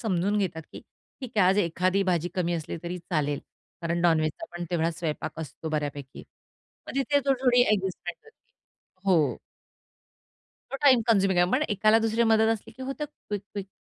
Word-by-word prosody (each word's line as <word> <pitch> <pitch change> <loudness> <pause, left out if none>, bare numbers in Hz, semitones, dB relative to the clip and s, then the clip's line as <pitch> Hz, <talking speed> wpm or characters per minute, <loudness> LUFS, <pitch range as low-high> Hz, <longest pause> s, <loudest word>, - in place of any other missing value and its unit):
समजून 200 -1 0
घेतात, 170 -5 -2
की - - -8 0.4
ठीक 255 -3 -6
आहे. 185 - +6
आज 195 +2 +3
एखादी 185 +1 +1
भाजी 175 -2 0
कमी 175 -2 0
असली 160 -3 -4
तरी 175 +1 -4
चालेल, 150 -4 -1 0.4
कारण 170 0 -1
नॉन-व्हेजचा 155 -3 +1
पण 175 - -4
तेवढा 165 -1 +1
स्वयंपाक 155 -2 -4
असतो 160 +1 -7
बऱ्यापैकी. 145 -3 -4 0.6
मग - - -7
तिथे 285 +1 +2
थोडी-थोडी 255 -2 +4
अ‍ॅडजस्टमेंट 190 -5 -1
होती 200 - -15
हो. 155 -10 +3 1.4
तो - - -1
टाईम 265 -4 +6
कन्झ्युमिंग 195 -4 +3
आहे. 180 +1 +3
पण 265 - +3
एकाला 215 +1 +4
दुसरी 225 +1 +1
मदत 220 0 +4
असली 220 - -7
की 260 - -8
होतं 270 +3 -4
क्विक-क्विक. 205 -8 -7
185 Hz, 160 wpm, -27 LUFS, 165-220 Hz, 1.4 s, आहे